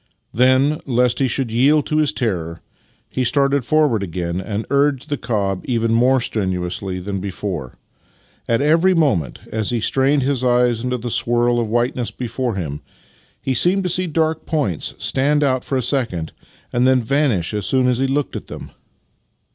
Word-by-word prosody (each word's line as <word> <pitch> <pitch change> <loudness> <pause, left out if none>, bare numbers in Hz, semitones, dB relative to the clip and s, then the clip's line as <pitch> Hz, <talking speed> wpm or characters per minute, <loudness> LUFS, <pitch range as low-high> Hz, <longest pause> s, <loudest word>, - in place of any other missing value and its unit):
Then, 130 +5 +3
lest 125 -1 +2
he 135 - +2
should 125 -1 -2
yield 140 +6 +3
to 155 - -1
his 155 -2 +2
terror, 90 -7 -3 0.5
he 130 - -2
started 140 +1 +2
forward 145 -4 +2
again, 85 -1 -3
and 105 +2 -4
urged 140 -2 +2
on - - -19
the 145 - -1
cob 100 -6 -2
even 115 -3 0
more 125 +3 +4
strenuously 95 -4 -3
than 100 +1 -4
before. 95 -7 -5 0.7
At 115 +3 +2
every 165 +5 +3
moment, 100 - 0
as 110 -2 -2
he 120 - 0
strained 135 +4 +2
his 135 -1 0
eyes 120 -2 +2
into 125 0 -1
the 120 0 -5
swirl 120 +1 +2
of 115 -2 -2
whiteness 120 +1 0
before 125 -1 -3
him, 75 -6 -4 0.6
he 135 - 0
seemed 180 +9 +3
to 180 - -1
see 180 +1 0
dark 160 0 -1
points 140 - -2
stand 145 +2 +1
out 130 -3 +1
for 135 - -2
a 130 - -1
second 115 - -1 0.4
and 125 +1 +3
then 130 -2 +3
vanish 130 - 0
as 105 -2 -2
soon 130 -1 +2
as 125 -1 +1
he 135 - +1
looked 140 +1 -1
at - - -6
them. - - -9
125 Hz, 180 wpm, -19 LUFS, 105-140 Hz, 0.7 s, more